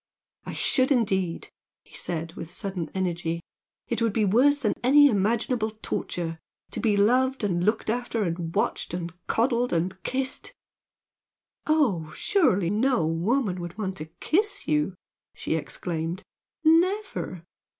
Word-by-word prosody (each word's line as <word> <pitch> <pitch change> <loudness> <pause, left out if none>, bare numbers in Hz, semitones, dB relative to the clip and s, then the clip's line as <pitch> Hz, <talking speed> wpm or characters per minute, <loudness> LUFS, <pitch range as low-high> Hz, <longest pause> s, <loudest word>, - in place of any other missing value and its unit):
"I - - -4
should, 260 0 +2
indeed!" 190 -9 +1 0.3
he - - -17
said, 165 -1 -4
with 165 - -7
sudden 185 -4 -4
energy 175 -3 -1 0.5
"It 235 -1 -2
would 230 -3 +2
be 215 -1 +2
worse 255 +9 +4
than 240 -7 0
any 290 +3 +7
imaginable 220 0 +1
torture! 165 -2 -3 0.3
to - - -4
be 215 -4 +2
'loved' 255 +5 +3
and 175 -4 +1
looked 215 +3 +1
after, 235 -1 -1
and 165 -2 -3
watched - - 0
and 170 -1 -4
coddled 240 +1 +1
and 180 +2 -1
kissed 260 0 -3 0.6
" - - -59
"Oh, 235 - +2
surely 200 - +2
no 225 -4 +2
woman 185 - 0
would 175 +2 -7
want 190 -3 -3
to 155 - -5
kiss 410 +5 0
you!" 150 +5 +1 0.4
she - - -2
exclaimed 165 +3 -3 0.4
"Never! 335 - +2
205 Hz, 140 wpm, -26 LUFS, 175-255 Hz, 0.6 s, any